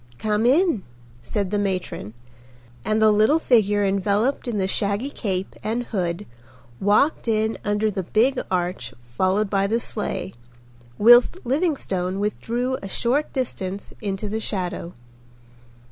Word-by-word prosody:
"Come 215 - +1
in," 310 - +3 0.4
said 185 +11 -2
the 205 - +1
matron, 185 - -3 0.7
and 215 0 +1
the 220 0 +5
little 215 +9 +4
figure 210 -8 +3
enveloped 205 +7 0
in 235 -3 -2
the 190 - +1
shaggy 200 +7 -1
cape 190 -6 -3
and 230 +3 -1
hood 185 -3 -3 0.5
walked 215 +9 +2
in 220 0 0
under 210 +1 +1
the 190 -1 -2
big 235 +9 +2
arch 180 -8 -2 0.2
followed 190 +7 +2
by 195 0 +1
the 225 +3 +1
sleigh, 220 - -3 0.6
whilst 240 - +7
Livingstone 240 - -1
withdrew 240 +5 -2
a 195 - -7
short 260 +9 0
distance 200 -7 -4
into 200 0 -3
the 215 +2 -2
shadow. 180 -4 -3
210 Hz, 130 wpm, -23 LUFS, 195-235 Hz, 0.7 s, whilst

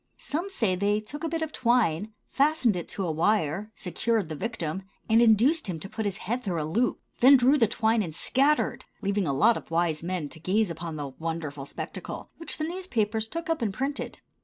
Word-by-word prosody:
Some 340 +7 -3
say 225 - +1
they 200 +3 +1
took 285 +9 -9
a 325 - 0
bit 325 0 -1
of 315 - -4
twine, 220 - +2 0.2
fastened 280 -6 +3
it 175 - -4
to 195 - -3
a 165 - 0
wire, 190 +3 +1
secured 195 +1 -1
the 155 - -4
victim, 190 -2 -3 0.3
and 225 +1 +5
induced 240 +8 +4
him 175 -4 -3
to 195 - -6
put 220 +1 -4
his 200 -1 -1
head 240 +6 -1
through 180 -8 -2
a 150 - -1
loop; 230 +11 0 0.2
then 270 +3 +8
drew 255 +3 +5
the 235 -6 +4
twine 225 +1 +2
and 165 -6 -4
scattered, 280 - +2 0.2
leaving 200 -2 0
a - - +1
lot 215 +13 +4
of - - -10
wise 165 -2 +1
men 175 -2 -2
to 160 - -8
gaze 195 +3 +1
upon 165 0 -5
the 145 -2 -4
wonderful 150 -1 -5
spectacle, - - -6
which 330 - -4
the 310 - -2
newspapers 235 - -1
took 330 +6 -5
up 325 -4 0
and 205 -4 -1
printed. 275 +2 -3
215 Hz, 210 wpm, -27 LUFS, 170-250 Hz, 0.3 s, then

